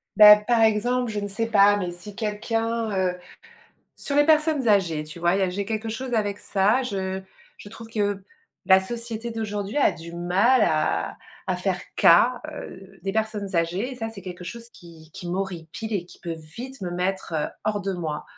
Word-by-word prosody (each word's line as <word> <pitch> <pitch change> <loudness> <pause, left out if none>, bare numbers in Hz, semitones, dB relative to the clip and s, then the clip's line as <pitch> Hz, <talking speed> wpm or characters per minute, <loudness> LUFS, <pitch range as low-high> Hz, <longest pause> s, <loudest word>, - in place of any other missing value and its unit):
Bah 210 -1 +11
par 225 +2 +1
exemple, 235 +3 +2
je 210 - -2
ne 205 - -3
sais 205 +3 -1
pas, 205 -2 +5
mais 180 -3 -3
si 185 +4 -9
quelqu'un, 225 +1 -2
heu 180 -1 0 0.8
sur 285 - -3
les 290 - +6
personnes 305 -5 +3
âgées, 175 -7 +2
tu 155 +2 -10
vois, 175 +1 +2
il - - +1
y - - +2
a 185 - +1
j'ai 200 +2 -3
quelque 220 +1 -3
chose 245 +3 -4
avec 205 -2 0
ça, 205 +7 +2
je 190 -5 -3 0.4
je - - -11
trouve 225 +1 -10
que 205 -3 -1 0.4
la 190 0 +7
société 230 +3 -5
d'aujourd'hui 210 -1 -4
a 290 - +4
du 170 0 -10
mal 195 +9 +3
à 85 - 0 0.3
à 185 - 0
faire 180 0 -1
cas, 240 +9 +5
heu, 195 -8 -10
des 195 +1 -2
personnes 215 -2 -2
âgées 175 +9 0
et - - -8
ça, 225 -2 -4
c'est 215 -3 -9
quelque 180 -1 -8
chose 230 +5 -7
qui 165 -5 -15
qui 175 - -7
m'horripile 185 +3 -4
et 185 -4 -2
qui - - -15
peut 170 - -4 0.2
vite 260 +2 -7
me 180 -2 -4
mettre, 180 0 -2
heu, 150 -1 0 0.2
hors 210 -1 0
de 195 0 -2
moi. 160 -4 -4
205 Hz, 200 wpm, -24 LUFS, 180-225 Hz, 0.8 s, Bah